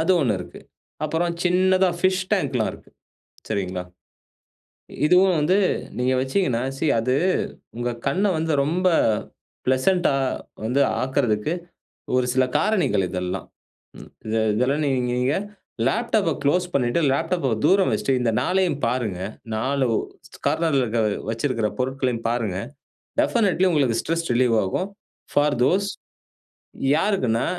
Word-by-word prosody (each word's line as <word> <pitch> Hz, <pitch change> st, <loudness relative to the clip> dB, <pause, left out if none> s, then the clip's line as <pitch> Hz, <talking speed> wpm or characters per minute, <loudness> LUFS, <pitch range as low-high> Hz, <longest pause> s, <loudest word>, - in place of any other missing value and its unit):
அது 165 Hz, +3 st, +1 dB
1 115 Hz, -9 st, +1 dB
இருக்கு. 90 Hz, -, -10 dB, 0.4 s
அப்புறம் 165 Hz, +3 st, 0 dB
சின்னதா 185 Hz, +1 st, +3 dB
பிஷ் 185 Hz, 0 st, +1 dB
டாங்க்லாம் -, -, +1 dB
இருக்கு. -, -, -15 dB, 0.6 s
சரிங்களா. 95 Hz, -4 st, -2 dB, 1.2 s
இதுவும் 180 Hz, +1 st, +5 dB
வந்து 180 Hz, +6 st, +3 dB, 0.4 s
நீங்க 125 Hz, +1 st, +1 dB
வச்சீங்கன்னா, 130 Hz, -3 st, 0 dB
சி 155 Hz, -, -1 dB
அது 125 Hz, +3 st, +1 dB, 0.6 s
உங்க 120 Hz, +1 st, -1 dB, 0.2 s
கண்ண 195 Hz, +3 st, +1 dB
வந்து 160 Hz, 0 st, -1 dB
ரொம்ப 180 Hz, +5 st, +1 dB, 0.8 s
பிளசன்ட்டா 140 Hz, +5 st, +2 dB, 0.5 s
வந்து 125 Hz, +5 st, +1 dB, 0.2 s
ஆக்கறதுக்கு 130 Hz, -1 st, 0 dB, 0.6 s
ஒரு 125 Hz, -, +2 dB
சில 130 Hz, 0 st, +3 dB
காரணிகள் 180 Hz, -, +1 dB
இதெல்லாம். 90 Hz, 0 st, -4 dB, 0.5 s
ம் -, -, -12 dB, 0.2 s
இத 110 Hz, +1 st, -2 dB, 0.2 s
இதெல்லாம் 135 Hz, +6 st, +1 dB
நீங் 130 Hz, -3 st, 0 dB
நீங்க 125 Hz, +3 st, +1 dB, 0.5 s
லேப்டாப்ப 220 Hz, -, +1 dB
குளோஸ் 180 Hz, +6 st, +2 dB
பண்ணிட்டு, 125 Hz, +2 st, +1 dB
லேப்டாப்ப 160 Hz, -1 st, 0 dB
தூரம் 195 Hz, 0 st, +4 dB
வெச்ட்டு, 135 Hz, -, 0 dB
இந்த 115 Hz, -2 st, +1 dB
நாலையும் 180 Hz, -6 st, +1 dB
பாருங்க. 115 Hz, -7 st, -2 dB, 0.4 s
4 135 Hz, +4 st, 0 dB, 0.6 s
கார்னர்ல 160 Hz, -5 st, +2 dB
இருக்க 115 Hz, 0 st, -1 dB, 0.3 s
வச்சிருக்கிற 115 Hz, -2 st, -1 dB
பொருட்களையும் 125 Hz, -3 st, -1 dB
பாருங்க. 115 Hz, -6 st, -1 dB, 0.6 s
டெஃபனட்லி 195 Hz, -, +2 dB
உங்களுக்கு 130 Hz, -7 st, +2 dB
ஸ்ட்ரெஸ் 165 Hz, +1 st, -2 dB
ரிலீவ் 120 Hz, -1 st, +3 dB
ஆகும். 180 Hz, -, -2 dB, 0.4 s
ஃபார் 145 Hz, -2 st, +2 dB
தோஸ் 195 Hz, +8 st, +2 dB, 1.1 s
யாருக்குன்னா! 145 Hz, -, +1 dB
135 Hz, 115 wpm, -23 LUFS, 120-180 Hz, 1.2 s, இதுவும்